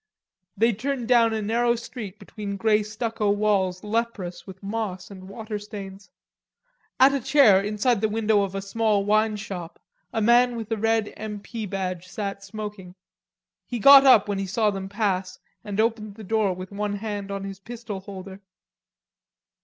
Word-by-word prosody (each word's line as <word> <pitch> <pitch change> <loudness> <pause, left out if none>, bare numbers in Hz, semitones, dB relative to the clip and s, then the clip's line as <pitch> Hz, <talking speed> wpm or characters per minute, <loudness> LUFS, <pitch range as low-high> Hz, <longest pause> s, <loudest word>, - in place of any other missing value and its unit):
They 230 +3 +3
turned 250 +2 -3
down 235 -2 +5
a 220 -1 -2
narrow 235 +3 +2
street 230 -4 -8
between 205 -2 -6
grey 215 +1 +3
stucco 215 0 -2
walls 200 -3 +1
leprous 210 -6 -3
with 190 +1 -11
moss 200 -2 -4
and 190 -1 -11
water 215 0 -5
stains. 200 -1 -9 0.9
At 270 +2 +7
a 275 - +1
chair 260 -7 +5
inside 210 +2 0
the 220 - +2
window 215 -1 +2
of 195 -1 -3
a 195 - -3
small 210 0 +1
wine 215 +1 +2
shop 190 -5 -7 0.3
a - - -1
man 240 +2 +4
with 225 -1 -6
a - - +2
red 225 0 +1
M. 210 -1 -5
P. 220 +1 -6
badge 185 -2 -4
sat 200 0 -5
smoking. 205 -3 -8 0.7
He 245 - -3
got 275 +5 +9
up 255 -7 +6
when 200 -1 -2
he 195 - -3
saw 215 +2 +1
them 195 -1 -5
pass 195 -3 -1 0.3
and 205 0 -5
opened 220 -2 0
the 220 - -10
door 215 -1 +1
with 185 +1 -7
one 205 0 -2
hand 205 -1 -5
on 200 0 -4
his 195 -1 -7
pistol 225 -1 -7
holster. 190 0 -9
210 Hz, 170 wpm, -25 LUFS, 195-225 Hz, 0.9 s, got